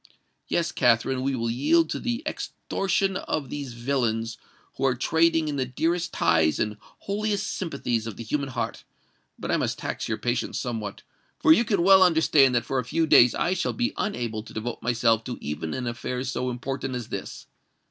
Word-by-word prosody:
Yes, 170 0 0
Katherine, 125 0 +2
we 135 +1 0
will 115 -1 -1
yield 155 +6 +2
to - - -2
the 240 +3 -2
extortion 195 -1 -1
of 145 -8 -3
these 140 -4 -5
villains 115 -3 -1 0.4
who - - -5
are 130 - +1
trading 160 +4 +2
in 145 -1 -2
the 130 - 0
dearest 165 +6 -1
ties 80 -1 +2
and 105 0 -1
holiest 205 0 -3
sympathies 130 - -2
of 110 - -6
the - - -6
human 140 +4 -2
heart; 120 -2 -4 0.5
but - - -4
I - - +3
must - - -1
tax - - -4
your - - -1
patience - - -2
somewhat—for 115 - -1
you 235 - +3
can 200 -6 +1
well 190 +1 +7
understand 160 -7 +5
that 120 -1 +1
for 135 - -1
a - - -1
few 160 +8 0
days 125 -5 +6
I 175 - +1
shall 190 - -1
be 245 0 -1
unable 120 - -2
to 110 - -13
devote 115 +2 -4
myself 115 -1 +2
to 125 - -5
even 75 +2 -4
an 130 - -3
affair 120 +2 -3
so 130 -1 -2
important 130 +1 -4
as 120 -3 -5
this. - - -6
130 Hz, 190 wpm, -26 LUFS, 120-165 Hz, 0.5 s, well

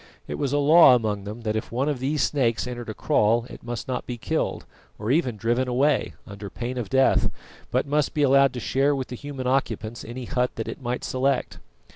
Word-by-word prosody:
It - - -5
was 140 -3 -1
a 145 - +2
law 145 -1 +7
among 105 -4 -1
them 105 +3 -7
that 110 -1 -2
if 110 - -3
one 130 +4 0
of 145 -4 -1
these 140 +4 0
snakes 120 -6 +1
entered 120 -2 -6
a - - -3
kraal 115 +3 +2
it - - -10
must 120 0 -5
not 130 -1 -3
be 120 - -4
killed, 110 - -2 0.3
or 110 +3 -2
even 130 -7 +1
driven 120 +4 0
away, 135 +3 +1
under 100 0 -8
pain 125 +3 -4
of 110 -5 -4
death, 130 +3 +3 0.4
but - - +1
must 145 0 0
be 150 - +2
allowed 140 -1 +5
to 125 - -4
share 140 +4 +1
with 130 -2 -4
the 125 - -5
human 135 0 -6
occupants 120 -3 -1
any 120 +2 -7
hut 125 +1 0
that 110 - -4
it - - -6
might 125 0 -3
select. 130 0 -1
125 Hz, 220 wpm, -25 LUFS, 115-135 Hz, 0.4 s, law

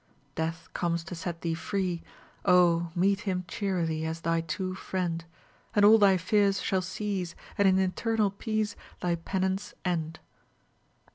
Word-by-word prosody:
Death 165 +1 -3
comes 170 -1 -1
to 185 - -8
set 170 0 -5
thee 165 -1 -1
free; 180 0 -2 0.4
Oh, 175 -2 +4
meet 195 +3 +3
him 185 -4 -2
cheerily 170 -6 -1
As 160 +1 -3
thy 165 0 +1
true 185 +3 -3
friend, 180 -3 -2 0.5
And 205 -1 +6
all 220 +2 +8
thy 195 -2 +6
fears 200 +2 +2
shall 190 -1 0
cease, 185 -1 -3 0.2
And 200 - +4
in 190 0 +5
eternal 205 +3 +1
peace 215 +1 -2 0.3
Thy 175 -1 +1
penance 190 +3 -2
end." 165 -3 -1
185 Hz, 145 wpm, -29 LUFS, 170-195 Hz, 0.5 s, all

